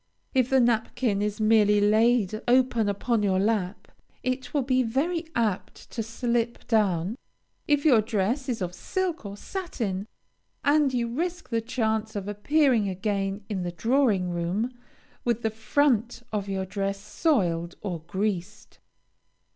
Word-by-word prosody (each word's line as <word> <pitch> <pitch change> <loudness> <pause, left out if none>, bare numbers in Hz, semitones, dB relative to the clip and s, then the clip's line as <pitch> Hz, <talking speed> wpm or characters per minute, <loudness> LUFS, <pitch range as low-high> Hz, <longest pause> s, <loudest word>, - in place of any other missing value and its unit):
If 255 -2 +2
the 265 - +4
napkin 235 -2 +1
is 210 0 -2
merely 215 -1 +4
laid 215 0 +3
open 245 -3 +3
upon 215 +3 0
your 195 -2 +2
lap, 205 -1 -1 0.3
it 255 +1 -2
will 285 -3 +1
be 255 0 +2
very 315 +8 -1
apt 215 -5 -2
to 230 - -3
slip 235 +1 -2
down, 200 -3 +1 0.5
if 290 0 +2
your 250 -8 +6
dress 225 +5 -1
is 225 -6 -1
of 180 0 -4
silk 350 - -3
or 200 0 -8
satin, 220 - -4 0.6
and 290 -1 +4
you 240 -2 0
risk 340 +8 -3
the 230 -2 0
chance 220 -2 -1
of 200 -1 -4
appearing 230 +1 +2
again 195 +1 -2
in 200 -4 -3
the 175 0 -3
drawing 220 - +2
room 175 +8 -1 0.5
with 235 -1 0
the 220 - +1
front 235 +1 +1
of 200 -2 -2
your 190 -1 -2
dress 195 +1 -2
soiled 195 - 0
or 180 -5 -3
greased. 190 0 -3
220 Hz, 145 wpm, -26 LUFS, 200-250 Hz, 0.6 s, your